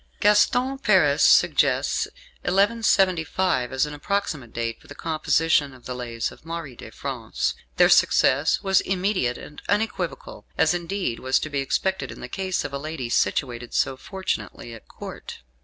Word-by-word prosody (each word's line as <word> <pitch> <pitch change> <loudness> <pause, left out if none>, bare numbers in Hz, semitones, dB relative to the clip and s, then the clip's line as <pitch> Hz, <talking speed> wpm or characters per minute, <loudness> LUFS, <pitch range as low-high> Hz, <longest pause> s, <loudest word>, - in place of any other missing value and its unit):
Gaston 245 +6 +3
Paris - - +3
suggests - - +4 0.3
1175 185 - +2
as 130 +2 +1
an 150 - -7
approximate 150 - -3
date 115 -1 -4
for - - -19
the 145 - -11
composition 155 -3 +1
of 125 - -18
the 125 - -4
"Lays" 120 -2 -4
of - - -16
Marie 165 -5 -6
de - - -10
France. - - -3 0.2
Their - - +7
success 145 +4 +3
was 190 -1 +3
immediate 185 -10 0
and 150 - -11
unequivocal, 200 -7 -2
as 160 - +3
indeed 175 -7 -2
was 130 0 +1
to 155 - -5
be 140 - -1
expected 190 +7 -1
in - - -10
the - - -7
case 190 -2 -2
of 145 - -6
a 140 - -3
lady 155 -4 -5
situated 120 +2 -1
so 135 - +1
fortunately 190 - -5
at 115 - -13
Court. - - -9
155 Hz, 155 wpm, -24 LUFS, 130-190 Hz, 0.3 s, Their